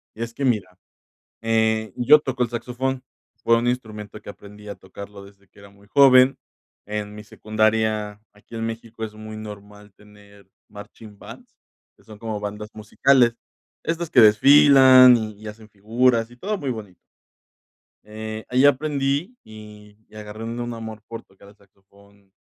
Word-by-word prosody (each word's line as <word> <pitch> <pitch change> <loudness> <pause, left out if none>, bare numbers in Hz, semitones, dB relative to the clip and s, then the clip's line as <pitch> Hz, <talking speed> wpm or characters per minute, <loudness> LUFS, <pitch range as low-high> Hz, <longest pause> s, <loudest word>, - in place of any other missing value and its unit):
Y 115 - -5
es 115 - -7
que 140 - -6
mira, 100 -7 -1 0.7
eh, 110 -1 0
yo 125 +5 +6
toco 130 -3 -3
el 120 - -1
saxofón. 125 +2 -4 0.4
Fue 115 - +3
un 120 +1 -1
instrumento 110 -4 -5
que - - -15
aprendí 105 +1 -14
a 100 - -6
tocarlo 100 +1 -12
desde 100 0 -20
que 100 - -21
era 100 0 -15
muy 100 0 -23
joven, 130 +2 +5 0.5
en 105 0 -5
mi 105 0 -11
secundaria. 110 -1 -1
Aquí 105 +3 -17
en 115 0 -3
México 115 0 -8
es 105 -1 -9
muy 110 0 -10
normal 105 -1 -12
tener 100 -1 -20 0.2
marching 105 +1 -13
bands, - - -14 0.4
que - - -27
son 110 -1 -14
como 110 -1 -5
bandas 105 +1 -6
musicales, 120 +3 +2 0.5
estas 165 0 -4
que 130 - +5
desfilan 130 +2 +7
y 110 -1 -7
hacen 110 0 -13
figuras 115 +3 0
y 120 - -16
todo 205 +10 -4
muy 145 - -5
bonito. 105 -6 -8 1.1
Eh, 110 +1 -8
ahí 130 +2 +2
aprendí 145 - 0
y 105 -1 -14
y - - -22
agarré 105 +1 -9
un 115 +1 -6
un 120 0 -5
amor 110 -1 -8
por 115 - -9
tocar 95 +1 -21
el 100 - -18
saxofón 100 0 -26
110 Hz, 165 wpm, -22 LUFS, 105-120 Hz, 1.1 s, desfilan